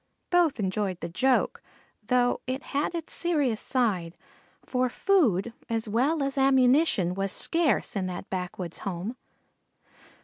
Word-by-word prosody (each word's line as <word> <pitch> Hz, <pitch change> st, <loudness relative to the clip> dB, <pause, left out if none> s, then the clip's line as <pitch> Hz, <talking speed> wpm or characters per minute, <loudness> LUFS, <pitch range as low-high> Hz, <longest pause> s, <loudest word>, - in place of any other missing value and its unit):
Both 345 Hz, -7 st, +3 dB
enjoyed 190 Hz, -2 st, -1 dB
the 170 Hz, -, -5 dB
joke, 255 Hz, +9 st, +1 dB, 0.5 s
though 245 Hz, -1 st, +2 dB
it 260 Hz, +2 st, -3 dB
had 290 Hz, +4 st, 0 dB
its 330 Hz, -2 st, -5 dB
serious 290 Hz, -10 st, 0 dB
side, 195 Hz, -10 st, 0 dB, 0.5 s
for 255 Hz, -1 st, 0 dB
food 240 Hz, -, +2 dB, 0.2 s
as 225 Hz, -1 st, -1 dB
well 275 Hz, +8 st, +1 dB
as 275 Hz, 0 st, -1 dB
ammunition 265 Hz, -, +4 dB
was 195 Hz, +1 st, -1 dB
scarce 330 Hz, -, 0 dB
in 190 Hz, -2 st, -1 dB
that 180 Hz, +1 st, -6 dB
backwoods 180 Hz, -2 st, -4 dB
home. 195 Hz, +4 st, -4 dB
245 Hz, 130 wpm, -27 LUFS, 190-275 Hz, 0.5 s, ammunition